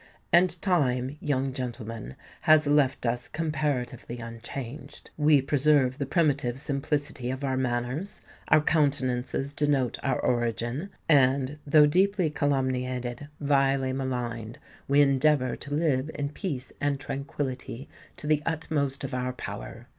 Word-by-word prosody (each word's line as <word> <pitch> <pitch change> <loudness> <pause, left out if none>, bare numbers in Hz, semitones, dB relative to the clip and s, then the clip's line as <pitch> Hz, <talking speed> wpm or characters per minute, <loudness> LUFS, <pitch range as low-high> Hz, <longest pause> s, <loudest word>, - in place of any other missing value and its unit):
And 175 0 +4
Time, 135 -7 +1
young 135 -3 -1
gentleman, 115 - -5 0.3
has 155 -1 +7
left 145 -3 +2
us 120 +1 -1
comparatively 145 -6 -2
unchanged; 115 +4 -8
we 150 -2 +4
preserve 140 -1 +3
the 140 - -2
primitive 140 -6 +1
simplicity 140 -2 -2
of 130 +2 -4
our 135 -1 0
manners; 130 +7 -2 0.2
our 155 - +5
countenances 140 -3 0
denote 145 -4 +1
our 130 -2 0
origin; 120 - -1 0.2
and, 140 -1 +3
though 150 +1 +7
deeply 185 +1 +2
calumniated—vilely 135 0 0
maligned, 120 -3 -3 0.3
we 140 +1 +5
endeavour 140 -1 +3
to 145 - -9
live 150 -3 +1
in 140 -1 -2
peace 145 -5 -5
and 145 -1 0
tranquillity 135 -2 -5 0.3
to - - -8
the 150 -1 +2
utmost 150 -4 -1
of 135 - -4
our 125 0 -2
power. - - -7
135 Hz, 125 wpm, -27 LUFS, 125-150 Hz, 0.3 s, has